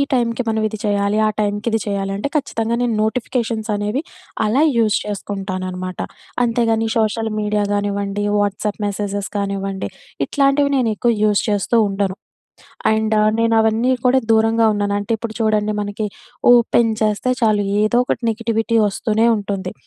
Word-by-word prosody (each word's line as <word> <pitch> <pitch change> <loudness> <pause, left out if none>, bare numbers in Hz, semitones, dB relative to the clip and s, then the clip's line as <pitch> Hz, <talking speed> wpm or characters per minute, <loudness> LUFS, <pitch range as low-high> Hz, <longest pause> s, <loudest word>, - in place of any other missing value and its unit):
టైంకి 240 -1 +1
మనం 220 -1 0
ఇది 215 0 -7
చేయాలి, 205 0 +1
ఆ - - +3
టైంకి 205 +1 -1
ఇది 225 - +1
చేయాలి. 200 -1 -2
అంటే 245 +8 -2
ఖచ్చితంగా 230 -5 -1
నేను 240 -2 +1
నోటిఫికేషన్సనేవి 220 -1 -1 0.4
అలా 245 +8 +2
యూజ్ 220 -2 +3
చేసుకుంటాననమాట. 185 -3 -5 0.4
అంతే 235 0 +1
కాని, 225 0 +1
సోషల్ 220 0 0
మీడియా 210 0 0
గానివ్వండి, 205 0 -1
వాట్సాప్ 205 +1 -1
మెసేజెస్ 205 0 -3
కానివ్వండి. 195 -1 -3 0.4
ఇట్లాంటివి 280 0 +2
నేను 240 -4 +2
ఎక్కువ 235 +3 +1
యూస్ 210 -1 +3
చేస్తూ 210 +3 +1
ఉండను. 195 -1 -2 0.8
అండ్ 220 0 +1 0.2
నేనవన్నీ 225 +2 +2
కూడా 260 +1 +4
దూరంగా 225 0 +3
ఉన్నాను. 205 0 0
అంటే 205 +3 -5
ఇప్పుడు 220 -1 -6
చూడండి! 215 -1 +1
మనకి 205 +1 -3 0.5
ఓపెన్ 235 -1 +3
చేస్తే 215 +4 +1
చాలు 210 -2 +2 0.2
ఏదో 225 +3 +3
ఒకటి 245 - -2
నెగటివిటీ 230 0 0
వస్తూనే 220 +3 +1
ఉంటుంది. 200 -1 -4
215 Hz, 140 wpm, -19 LUFS, 205-230 Hz, 0.8 s, కూడా